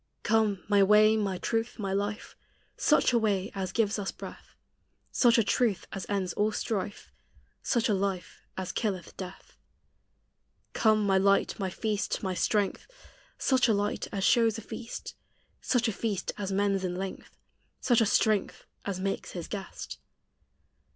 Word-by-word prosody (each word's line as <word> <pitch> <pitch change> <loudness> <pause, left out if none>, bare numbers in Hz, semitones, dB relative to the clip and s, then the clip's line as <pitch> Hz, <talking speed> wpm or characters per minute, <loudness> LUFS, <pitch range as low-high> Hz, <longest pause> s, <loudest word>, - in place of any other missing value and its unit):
Come, 215 -4 +2
my 205 -1 +4
way, 210 +2 +6
my 200 -4 -1
truth, 225 +4 -2
my 195 -4 -2
life 205 +2 -3 0.4
Such 300 -4 +3
a 235 - +4
way 205 -3 0
as 190 -2 -3
gives 215 -1 +1
us 195 - -2
breath; - - -11 0.6
Such 240 -2 +4
a 230 - +4
truth 215 -2 +1
as 195 - -5
ends 195 -3 -1
all 210 +1 +1
strife; 205 -1 -3 0.5
Such 235 -3 +1
a 215 - +2
life 190 -2 -2 0.2
as 190 -1 -3
killeth 195 -6 -3
death. 185 -1 -9 1.2
Come 215 -2 +3
my 195 -1 +4
light, 200 +2 +2
my 190 -2 -1
feast, 210 +2 -2
my 190 -1 -1
strength 205 +2 0 0.5
Such 260 -2 +3
a 220 - +3
light 205 +1 -1
as 195 -1 -2
shows 230 -1 +4
a - - -6
feast; 225 +2 -7 0.5
Such 245 -2 +1
a - - +1
feast 205 -2 -2
as 200 -1 -4
mends 195 0 +1
in 180 -1 -2
length; 190 +1 -6 0.4
Such 240 -2 +3
a 225 - +3
strength 215 -1 +1 0.2
as 195 -2 -3
makes 195 +1 -3
His 175 -3 -5
guest. 200 -2 -7
205 Hz, 160 wpm, -29 LUFS, 195-220 Hz, 1.2 s, way